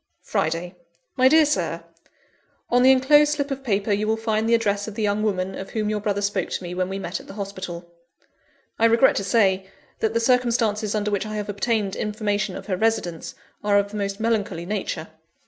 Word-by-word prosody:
"Friday. 170 +3 -1 0.4
"My 260 -1 +5
DEAR 315 +3 +6
SIR, 295 - -1 0.9
"On 245 +1 +4
the 260 +1 +7
enclosed 295 +3 +5
slip 285 -1 -2
of 270 0 -4
paper 205 -3 0
you 205 +1 +1
will 220 0 +1
find 220 0 0
the 235 - +5
address 205 -2 0
of 215 - -7
the 220 - -2
young 205 0 +1
woman, 190 -3 -1
of 190 0 -7
whom 215 -1 -1
your 210 - -1
brother 205 -1 -1
spoke 200 -3 -1
to - - -4
me 175 0 -5
when 185 0 -1
we 195 - -3
met 185 -1 -4
at - - -14
the - - -10
hospital. 185 -4 -6 0.9
I 225 - +4
regret 230 +3 +5
to - - -1
say, 190 -2 +2 0.3
that 220 +1 0
the - - +3
circumstances 230 -4 +1
under 210 0 -1
which 205 +1 -1
I 215 - -5
have 210 -1 -4
obtained 205 -1 -1
information 210 -2 -2
of - - -8
her 185 -3 -2
residence, 200 -6 -1 0.3
are 205 -1 +3
of 200 0 +1
the 210 - -5
most 200 0 -3
melancholy 205 -7 -1
nature. 185 -5 -3
210 Hz, 210 wpm, -23 LUFS, 195-230 Hz, 0.9 s, the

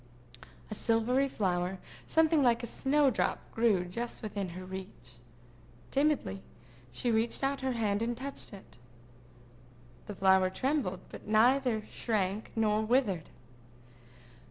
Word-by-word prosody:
A - - -1
silvery 240 +5 +1
flower, 185 -4 -1 0.3
something 320 -1 +4
like 240 -2 +3
a - - -1
snow 275 +3 +2
drop, - - 0 0.2
grew 220 -6 +2
just 235 +7 -5
within 200 -3 -3
her 185 - -7
reach. 185 - -9 0.7
Timidly 275 - +1 0.5
she 235 - -1
stretched 225 +4 0
out 275 0 0
her 265 -1 0
hand 215 -3 0
and 235 +1 -1
touched 275 +1 -6
it. 195 - -13 1.3
The 205 - -6
flower 190 0 +4
trembled, 240 -2 -1
but - - -11
neither 235 +1 +3
shrank 210 -2 -2
nor 215 -1 +2
withered. 220 - +1
220 Hz, 125 wpm, -31 LUFS, 190-255 Hz, 1.3 s, something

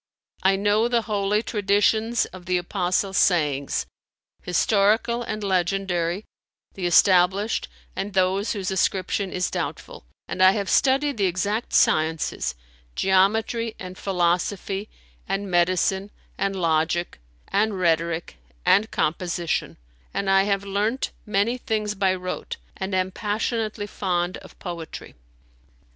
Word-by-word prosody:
I 190 +1 +4
know 205 +3 +2
the 240 -1 +1
Holy 210 0 0
Traditions 215 +2 +2
of 185 -1 -11
the 180 0 +2
Apostle's 185 +2 -1
sayings, 145 -6 +2 0.6
historical 215 +6 +2
and 215 -2 -4
legendary, 185 -1 0 0.5
the 185 -2 -2
established 190 +4 +4 0.3
and 200 0 -4
those 190 +3 +2
whose 195 -3 -3
ascription 190 +1 0
is 180 0 -1
doubtful; - - -5 0.2
and 185 - -3
I 185 0 +7
have 200 -2 -2
studied 275 0 +3
the 200 -2 +2
exact 200 +6 -1
sciences, 155 - +2 0.4
geometry 220 +4 +2
and 185 -1 -8
philosophy 190 +2 -1 0.4
and 195 0 -2
medicine 185 +3 +2 0.3
and 195 0 -1
logic 165 - 0 0.3
and 205 -1 +1
rhetoric 165 - 0 0.3
and 210 +3 +4
composition; 170 +1 -1 0.4
and 195 -1 0
I 195 0 +5
have 200 -1 0
learnt 210 +6 -1 0.2
many 210 +4 +1
things 215 -3 -1
by 190 -2 +1
rote 185 0 -5 0.2
and 190 0 -3
am 185 0 0
passionately 215 +1 -2
fond 180 -3 -2
of - - -15
poetry. 170 -3 -7
195 Hz, 120 wpm, -24 LUFS, 180-210 Hz, 0.6 s, I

